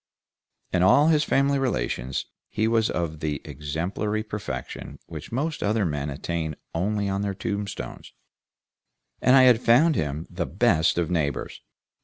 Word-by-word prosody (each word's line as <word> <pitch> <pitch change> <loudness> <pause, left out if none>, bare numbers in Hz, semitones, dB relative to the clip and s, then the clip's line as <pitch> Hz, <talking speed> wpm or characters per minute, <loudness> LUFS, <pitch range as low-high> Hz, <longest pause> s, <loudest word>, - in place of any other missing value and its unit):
In 90 - +2
all 140 - +6
his 155 -2 +4
family 140 0 +2
relations 65 - -1 0.2
he 110 - 0
was 115 -1 +2
of 80 -3 -2
the 75 -2 -2
exemplary 85 +9 -3
perfection 105 -1 -6
which - - -9
most 150 +6 -2
other 105 0 +1
men 75 -3 -2
attain 80 +2 -3 0.2
only 100 +4 0
on 95 0 -1
their 100 -1 -2
tombstones, 100 +1 -5 1.1
and 130 - +5
I 130 - +8
had 125 -2 +6
found 135 +9 +5
him 75 +2 -2
the - - -4
best 80 +2 +2
of 85 0 0
neighbors. 75 -5 -2
100 Hz, 145 wpm, -25 LUFS, 80-115 Hz, 1.1 s, I